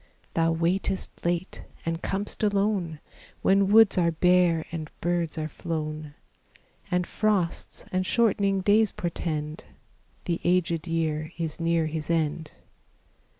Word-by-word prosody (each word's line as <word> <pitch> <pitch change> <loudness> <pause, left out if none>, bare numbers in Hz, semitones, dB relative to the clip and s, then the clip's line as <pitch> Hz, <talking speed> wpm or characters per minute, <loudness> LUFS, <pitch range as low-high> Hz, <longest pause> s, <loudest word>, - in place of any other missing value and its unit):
Thou 165 0 +2
waitest 175 +4 0
late, 175 +2 -2 0.2
and 165 0 -2
com'st 200 +2 -3
alone, 200 -6 +1 0.4
When 195 0 +4
woods 220 -3 +6
are 170 -1 +3
bare 175 -1 +3
and 155 -2 -5
birds 170 -2 -1
are 155 -1 -2
flown, 155 -2 -5 0.7
And 180 0 +1
frosts 200 -5 -1
and 185 0 +1
shortening 200 -2 +2
days 210 +2 +4
portend 155 -3 -3 0.6
The 170 -1 -1
aged 175 -2 +1
year 160 -1 -1
is 165 -2 -3
near 165 -1 +2
his 155 -1 -4
end. 160 -1 -1
170 Hz, 120 wpm, -26 LUFS, 160-190 Hz, 0.7 s, woods